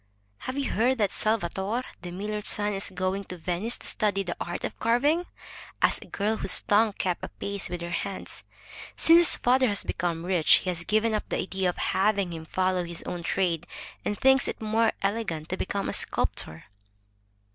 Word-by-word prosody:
Have 255 +2 -5
you 275 -3 -1
heard 250 +4 +2
that 205 -3 +1
Salvator, 215 +2 -1 0.2
the 175 - -6
miller's 210 +4 -4
son, 210 -1 +1
is 195 0 0
going 185 +1 -2
to 180 - -8
Venice 180 +7 -1
to - - -12
study 205 -3 0
the 175 -2 -4
art 175 - -4
of - - -5
carving?" 285 +10 +2 0.5
asked - - +2
a - - -16
girl 215 +2 -1
whose 190 - +4
tongue 210 +1 +3
kept 180 -2 -2
pace 200 -1 -2
with 175 -1 -5
her 170 0 -5
hands. 195 +3 -4 0.5
Since 330 +1 +6
his 345 - +6
father 255 +1 +3
has 205 -2 0
become 170 -1 -2
rich, 180 -4 +4
he 185 - 0
has 170 -1 -4
given 220 +2 +2
up 215 - -2
the - - -1
idea 190 -1 -1
of 175 - -4
having 195 -2 +1
him 160 -1 -7
follow 185 0 0
his 170 -1 -5
own 175 - -5
trade, 175 -1 0 0.4
and 210 - -2
thinks 265 0 +4
it - - -4
more 220 +1 +2
elegant 195 -7 -2
to 185 - -1
become 200 +1 -2
a - - -2
sculptor." 80 +1 -1
200 Hz, 190 wpm, -27 LUFS, 180-220 Hz, 0.5 s, Since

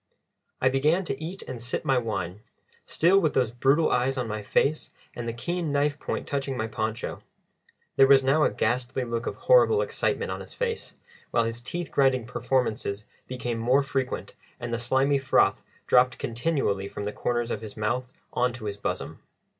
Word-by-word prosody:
I 130 - +3
began 150 +8 +2
to 160 - -4
eat 180 +4 -6
and 125 -3 -7
sip 120 +2 -3
my 135 -2 +3
wine, 105 -5 -3 0.5
still 180 +4 +4
with 160 -6 0
those 125 -4 +2
brutal 135 +6 +3
eyes 130 +2 +1
on 125 -2 -1
my 105 -1 -3
face 140 +8 +1 0.3
and 120 -1 -5
the - - 0
keen 165 +7 -3
knife 145 +1 +1
point - - -4
touching 135 -2 -2
my 110 - -1
poncho. 110 +1 -3 0.8
There 135 - +7
was 135 -1 +6
now 140 +4 +3
a - - +4
ghastly 125 +2 -1
look 115 -1 -3
of - - -2
horrible - - +5
excitement - - -1
on - - -4
his - - -11
face, 470 -2 -3 0.3
while - - +2
his 115 +1 -3
teeth 175 +7 -4
grinding 130 -4 +3
performances 120 -4 -1 0.2
became 120 -2 -3
more 130 +5 +3
frequent 135 -1 -3 0.3
and 120 -1 -4
the 115 - -1
slimy 135 +4 +2
froth 135 - +3 0.2
dropped 125 +1 +4
continually 115 -6 -1
from 100 - -6
the 105 - -3
corners 120 -1 -1
of 105 - -3
his 110 -1 -9
mouth 120 +4 -1 0.2
on 125 0 +1
to 120 -3 -8
his 100 -1 -3
bosom. - - -4
125 Hz, 185 wpm, -26 LUFS, 115-140 Hz, 0.8 s, There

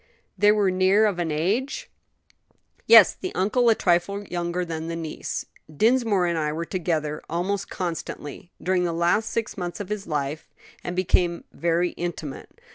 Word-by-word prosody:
"They 205 +1 +5
were 205 -3 +2
near 190 +3 +4
of 200 -4 0
an 170 -2 -1
age?" 195 - -1 1.0
"Yes; - - +9
the 370 - -6
uncle 230 +6 +2
a 225 - +5
trifle 185 +3 +1
younger 175 -1 -2
than 160 -1 -5
the 165 - -3
niece." 165 -2 -4 0.3
"Dinsmore 220 - +2
and 170 -2 0
I 150 -1 0
were 165 +2 -3
together 160 -5 -2
almost 185 +4 -2
constantly 170 -3 -5
during 185 0 +1
the 170 -1 -1
last 170 +6 +1
six 225 -3 -3
months 175 +1 -4
of 205 -2 -6
his 210 -2 -4
life, 150 -1 -3 0.3
and 175 - -4
became 175 -1 +1
very 170 +1 +1
intimate. 165 -5 -6
175 Hz, 160 wpm, -24 LUFS, 165-200 Hz, 1.0 s, Yes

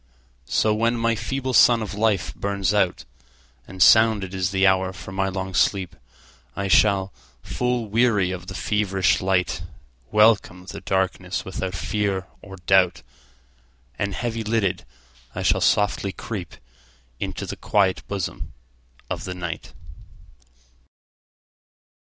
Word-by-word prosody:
So 105 +11 +2
when 115 +2 +1
my 115 0 +1
feeble 130 +4 -3
sun 120 -1 +6
of 105 - -6
life 100 -8 0
burns 100 -1 -1
out, 95 -4 +1 0.6
And 95 -2 +1
sounded 110 -4 +5
is 95 -2 -1
the 95 0 +2
hour 95 0 +2
for 85 +1 -10
my 95 0 -1
long 95 0 -4
sleep,I 65 -4 -3
shall, 95 0 +3 0.3
full 125 -1 -1
weary 105 -4 +2
of 95 - -7
the - - -7
feverish 95 -3 +1
light, 90 -4 0 0.5
Welcome 105 -4 +3
the - - -8
darkness 95 -1 -2
without 95 0 -4
fear 100 -1 -1 0.2
or 95 -1 -10
doubt, 90 -5 +2 1.0
And 100 -1 -2
heavy 115 -2 -3
lidded, 105 -5 -1 0.5
I - - -3
shall - - +2
softly 105 -1 +2
creepInto 65 - -8
the - - -5
quiet 95 -3 +1
bosom 100 -4 -5 0.5
of - - -4
the 90 - -5
Night. 85 -2 -6
95 Hz, 120 wpm, -23 LUFS, 90-105 Hz, 1.0 s, sun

